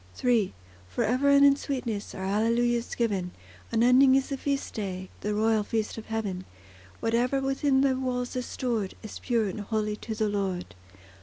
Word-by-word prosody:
III 230 -6 +3 0.4
For 95 - -1
ever 255 +5 +2
and 280 0 +7
in 280 0 +7
sweetness 245 -7 -4
Are 190 - -5
Alleluias 230 +4 +1
given; 195 -6 -1 0.4
Unending 250 +3 +5
is 270 0 +1
the 275 - -2
feast 280 0 -2
day, 190 -3 -4
The 210 0 -2
royal 220 0 +2
feast 220 +1 -2
of 225 - -9
heaven; 205 -5 -3 0.6
Whate'er 240 +4 +1
within 270 0 +2
thy 270 -1 +3
walls 255 -1 -2
is 250 -1 -3
stored, 230 -7 -2
Is 215 - -7
pure 230 -4 0
and 200 +2 -4
holy 210 0 -1
to 220 0 -5
the 215 0 0
Lord. 195 -3 -2
230 Hz, 170 wpm, -27 LUFS, 210-255 Hz, 0.6 s, and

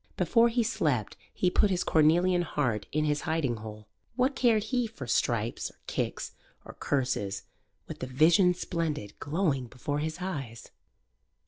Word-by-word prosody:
Before 235 0 +4
he 235 0 +1
slept 150 - 0 0.2
he 180 - 0
put 205 - +3
his 185 -2 0
cornelian 175 +3 +4
heart 125 - -1
in 155 +1 +1
his 150 -1 0
hiding 160 -8 -1
hole. 105 0 -9 0.3
What 260 +3 +1
cared 230 -5 +3
he 245 +1 0
for 215 -12 -8
stripes 115 -1 0
or - - -22
kicks - - -3 0.3
or - - -10
curses 125 -8 -1 0.4
with - - -8
the 130 - -4
Vision 165 +7 +4
Splendid 160 - -3
glowing 145 -5 0
before 145 +4 -3
his 155 +2 -3
eyes? 135 -11 -6
155 Hz, 150 wpm, -29 LUFS, 125-185 Hz, 0.4 s, Before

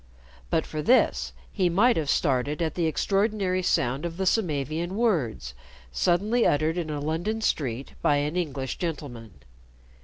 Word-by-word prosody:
But 160 - +1
for 155 - -4
this 250 +11 +3 0.2
he 185 -4 +1
might 225 +8 +4
have 155 -3 -1
started 140 0 +1
at 160 -3 -1
the 170 -2 0
extraordinary 195 +2 0
sound 130 -5 0
of 170 -1 -4
the 190 - -1
Samavian 170 - 0
words 155 - 0 0.4
suddenly 205 - +2
uttered 155 +4 +2
in 165 -2 -4
a 150 -1 -3
London 165 +9 -2
street 135 - -2
by 145 - +3
an 145 +3 -1
English 140 -7 -3
gentleman. 130 - -5
160 Hz, 150 wpm, -26 LUFS, 145-185 Hz, 0.4 s, might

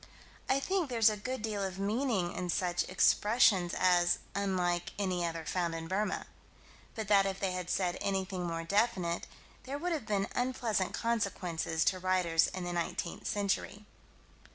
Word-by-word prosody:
I 270 - +3
think 365 0 0
there's 225 -3 +4
a - - -2
good 255 +3 -5
deal 210 -2 -2
of 190 -1 -3
meaning 205 -2 0
in 180 - -4
such 175 0 0
expressions 190 -1 +4
as 175 -1 +4 0.2
"unlike 180 -3 0
any 185 -3 0
other 165 -1 -3
found 170 -1 -1
in 165 0 -5
Burma" 205 +4 -1 0.7
but 220 -2 -4
that 200 -1 +5
if 195 0 -3
they 190 -2 0
had 180 -1 -4
said 180 -2 0
anything 190 -2 -1
more 165 0 -3
definite, 185 -2 0 0.4
there 275 +2 -4
would 355 +4 -2
have 300 -10 -2
been 200 -2 0
unpleasant 245 -6 0
consequences 180 -8 -1
to 185 - +2
writers 180 -3 +2
in 185 - -5
the 175 - -3
19th 170 0 -3
century. 205 0 -1
190 Hz, 160 wpm, -32 LUFS, 175-215 Hz, 0.7 s, that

